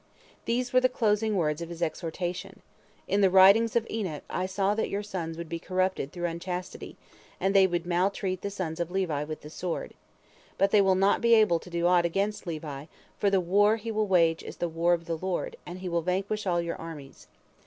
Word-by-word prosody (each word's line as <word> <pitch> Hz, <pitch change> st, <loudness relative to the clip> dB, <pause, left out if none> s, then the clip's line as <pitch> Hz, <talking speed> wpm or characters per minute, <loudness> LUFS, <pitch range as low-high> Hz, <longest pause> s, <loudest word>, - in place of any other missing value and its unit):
These 245 Hz, +1 st, -1 dB
were 255 Hz, -, +5 dB
the 255 Hz, -, +4 dB
closing 215 Hz, -3 st, +1 dB
words 155 Hz, -3 st, 0 dB
of 170 Hz, -, -5 dB
his 170 Hz, 0 st, -4 dB
exhortation: 175 Hz, +2 st, -4 dB, 0.4 s
"In 200 Hz, -, +1 dB
the 195 Hz, -, +5 dB
writings 200 Hz, +5 st, +6 dB
of 235 Hz, -1 st, +2 dB
Enoch 190 Hz, -9 st, -4 dB
I 185 Hz, -, -1 dB
saw 195 Hz, +1 st, 0 dB
that 220 Hz, -, -1 dB
your 200 Hz, +1 st, -2 dB
sons 170 Hz, -5 st, -5 dB
would 170 Hz, -1 st, -6 dB
be 170 Hz, +1 st, -4 dB
corrupted 185 Hz, -5 st, -1 dB
through 175 Hz, -1 st, -4 dB
unchastity, 180 Hz, +2 st, -5 dB, 0.4 s
and 195 Hz, +1 st, +1 dB
they 195 Hz, -1 st, +6 dB
would 175 Hz, -1 st, -2 dB
maltreat 185 Hz, +1 st, 0 dB
the 200 Hz, -, -3 dB
sons 175 Hz, -5 st, -4 dB
of 170 Hz, -1 st, -2 dB
Levi 180 Hz, -6 st, -1 dB
with 155 Hz, +1 st, -6 dB
the 150 Hz, -, -11 dB
sword. 175 Hz, 0 st, -4 dB, 0.6 s
But 195 Hz, -, +2 dB
they 210 Hz, -, +6 dB
will 190 Hz, -1 st, +3 dB
not 195 Hz, +2 st, +3 dB
be 235 Hz, 0 st, +5 dB
able 210 Hz, -7 st, +4 dB
to 180 Hz, -, -13 dB
do 170 Hz, 0 st, -1 dB
aught 175 Hz, 0 st, +4 dB
against 200 Hz, +3 st, -2 dB
Levi, 150 Hz, -4 st, -5 dB, 0.3 s
for 205 Hz, -, +3 dB
the 195 Hz, -1 st, +3 dB
war 205 Hz, +4 st, +3 dB
he 225 Hz, 0 st, -5 dB
will 215 Hz, -1 st, 0 dB
wage 165 Hz, -3 st, +3 dB
is -, -, -9 dB
the 175 Hz, -, -1 dB
war 170 Hz, +1 st, +1 dB
of 170 Hz, -1 st, -10 dB
the 165 Hz, -1 st, -2 dB
Lord, 185 Hz, 0 st, -3 dB
and 175 Hz, +1 st, -6 dB
he 185 Hz, 0 st, -6 dB
will 170 Hz, -1 st, 0 dB
vanquish 195 Hz, +4 st, -2 dB
all 175 Hz, -1 st, +2 dB
your 170 Hz, 0 st, -4 dB
armies. 155 Hz, -5 st, -10 dB
185 Hz, 215 wpm, -28 LUFS, 170-200 Hz, 0.6 s, writings